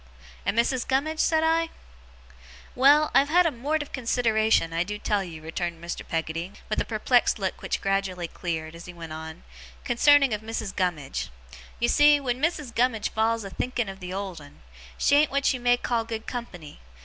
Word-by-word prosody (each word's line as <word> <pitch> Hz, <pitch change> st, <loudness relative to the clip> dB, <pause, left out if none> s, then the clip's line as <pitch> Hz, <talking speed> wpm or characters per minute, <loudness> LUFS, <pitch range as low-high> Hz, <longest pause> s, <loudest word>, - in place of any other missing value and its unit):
'And 200 Hz, -, 0 dB
Mrs. 240 Hz, +1 st, +1 dB
Gummidge?' 305 Hz, +4 st, 0 dB
said 320 Hz, -1 st, +3 dB
I. 325 Hz, +1 st, +2 dB, 1.0 s
'Well, 290 Hz, +4 st, +5 dB
I've 275 Hz, +1 st, +4 dB
had 355 Hz, +3 st, +5 dB
a 330 Hz, -, +2 dB
mort 295 Hz, +5 st, -1 dB
of 290 Hz, -, -16 dB
consideration, 225 Hz, -8 st, +1 dB
I 165 Hz, +1 st, +1 dB
do 210 Hz, +3 st, -5 dB
tell 205 Hz, -1 st, 0 dB
you,' 160 Hz, -4 st, -9 dB
returned 170 Hz, +1 st, -4 dB
Mr. 170 Hz, +1 st, -5 dB
Peggotty, 165 Hz, +3 st, -3 dB, 0.2 s
with 215 Hz, -, 0 dB
a -, -, -2 dB
perplexed 240 Hz, +3 st, +2 dB
look 195 Hz, -3 st, -3 dB
which -, -, -2 dB
gradually 195 Hz, -3 st, -1 dB
cleared 160 Hz, -2 st, -4 dB
as 170 Hz, +1 st, -10 dB
he 180 Hz, -, -10 dB
went 165 Hz, -2 st, -8 dB
on, 160 Hz, 0 st, -8 dB, 0.4 s
'concerning 275 Hz, +1 st, +4 dB
of 210 Hz, -, -2 dB
Missis 220 Hz, -2 st, -4 dB
Gummidge. 175 Hz, -8 st, -2 dB, 0.5 s
You 235 Hz, -, +2 dB
see, 295 Hz, +3 st, +5 dB
wen 255 Hz, -2 st, -2 dB
Missis 300 Hz, -5 st, -1 dB
Gummidge 230 Hz, -2 st, 0 dB
falls 225 Hz, 0 st, +1 dB
a 195 Hz, -, -7 dB
thinking 245 Hz, -2 st, -2 dB
of 195 Hz, 0 st, -8 dB
the 180 Hz, -1 st, -7 dB
old 190 Hz, -4 st, -5 dB
'un, 145 Hz, -, -16 dB, 0.3 s
she 285 Hz, -, +4 dB
an't 305 Hz, -, +1 dB
what 280 Hz, 0 st, +1 dB
you 255 Hz, -, -4 dB
may 245 Hz, 0 st, +3 dB
call 235 Hz, -2 st, -1 dB
good 225 Hz, -1 st, -6 dB
company. 180 Hz, -11 st, -7 dB
225 Hz, 190 wpm, -26 LUFS, 180-265 Hz, 1.0 s, Well